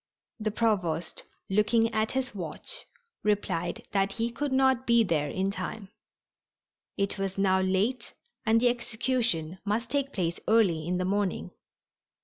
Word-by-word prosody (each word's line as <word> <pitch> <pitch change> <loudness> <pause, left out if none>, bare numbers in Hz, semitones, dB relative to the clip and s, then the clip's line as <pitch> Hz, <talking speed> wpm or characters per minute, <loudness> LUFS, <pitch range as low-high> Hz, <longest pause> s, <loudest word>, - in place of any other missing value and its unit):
The 215 0 0
Provost, 185 -7 -1 0.2
looking 225 +3 +2
at 220 0 0
his 265 0 -1
watch, 175 -7 -3 0.4
replied 190 -5 -1
that 195 0 +1
he 235 +1 -1
could 285 +3 -2
not 265 -1 +3
be 235 -1 +5
there 155 -7 0
in 190 +5 -1
time. 195 +1 -5 1.1
It 200 0 -1
was 195 -1 -2
now 190 -1 +3
late 195 +7 0 0.3
and 225 -1 +4
the 245 +1 +4
execution 230 -8 0
must 225 +4 -1
take 280 -1 +1
place 170 -6 -2
early 185 -8 +3
in 180 +1 0
the 185 - -1
morning. 200 0 -1
205 Hz, 140 wpm, -28 LUFS, 185-235 Hz, 1.1 s, be